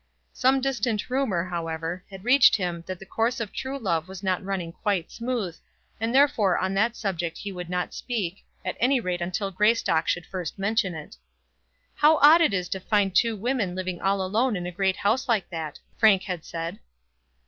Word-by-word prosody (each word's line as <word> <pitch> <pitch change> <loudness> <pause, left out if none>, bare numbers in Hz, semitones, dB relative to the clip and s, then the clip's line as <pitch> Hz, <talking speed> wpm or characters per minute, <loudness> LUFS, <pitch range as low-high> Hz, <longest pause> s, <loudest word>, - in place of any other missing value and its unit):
Some 265 +1 +3
distant 250 -4 -1
rumour, 235 -10 0
however, 165 0 -4
had 195 -1 -10
reached 250 +2 +6
him 175 -4 -3
that 185 - -4
the 195 - -12
course 230 +5 -1
of 225 -3 -4
true 270 +1 -4
love 170 - -1
was 190 +1 -9
not 185 -1 0
running 190 -3 -3
quite 190 -2 -2
smooth, 235 -8 -3 0.4
and 225 +1 -1
therefore 260 -8 +4
on 190 +1 -1
that 225 +4 +1
subject 175 -6 -3
he 200 - -6
would 180 -2 -7
not 180 0 -2
speak, 205 -7 -4 0.2
at - - -2
any 260 +2 +3
rate 180 -5 -2
till 195 +2 -2
Greystock 195 -4 +2
should 175 - 0
first 180 -3 -5
mention 200 -2 0
it. 150 - -9 0.8
"How 305 +1 +5
odd 310 +4 +7
it 330 - +4
is 180 -2 -1
to 190 - -2
find 200 -1 +1
two 230 +4 +3
women 215 -4 -1
living 185 -2 -4
all 195 0 +1
alone 220 +5 +1
in 175 -1 -4
a 180 - -4
great 190 +1 +1
house 225 +6 0
like 220 -5 +2
that," 160 -3 -5 0.2
Frank 210 -4 +5
had 180 -4 -4
said. 165 +4 -5
195 Hz, 190 wpm, -26 LUFS, 180-230 Hz, 0.8 s, odd